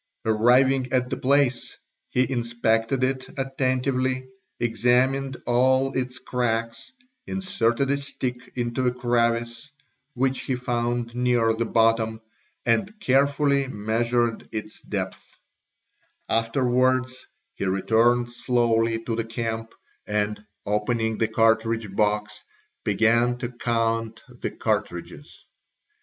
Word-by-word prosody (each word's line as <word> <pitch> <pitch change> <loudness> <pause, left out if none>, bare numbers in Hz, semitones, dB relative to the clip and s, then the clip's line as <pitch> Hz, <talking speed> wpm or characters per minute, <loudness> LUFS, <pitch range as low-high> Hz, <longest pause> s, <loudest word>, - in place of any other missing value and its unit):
Arriving 125 +4 +3
at 125 -1 +1
the - - 0
place 135 -2 +1 0.3
he 125 0 +1
inspected 115 0 0
if 130 0 -1
attentively, 130 -1 0 0.3
examined 125 +4 +1
all 130 +2 +3
its 130 0 -2
cracks, 115 - -2 0.4
inserted 140 -9 0
a 140 - +2
stick 125 -3 -5
into 120 +1 -1
a - - +3
crevice 120 +1 -1 0.4
which 130 +1 +1
he 130 - -2
found 120 -1 -2
near 120 -2 +2
the 115 +1 -2
bottom, 115 -1 +2 0.5
and 190 - 0
carefully 140 -2 +2
measured 115 +1 -1
its 110 -1 -6
depths; 95 -3 -5 0.9
afterwards 130 +2 +1 0.3
he - - -4
returned 115 +5 +2
slowly 115 -2 +1
to 115 - -2
the 115 - -1
camp 115 0 -4 0.3
and, 105 0 -1 0.2
opening 110 +1 0
the 110 - +2
cartridge 110 -2 +1
box, 105 0 0 0.4
began 120 +2 +2
to 120 -1 -4
count 115 -2 -1
the - - -5
cartridges. 85 - -4
120 Hz, 105 wpm, -25 LUFS, 115-130 Hz, 0.9 s, Arriving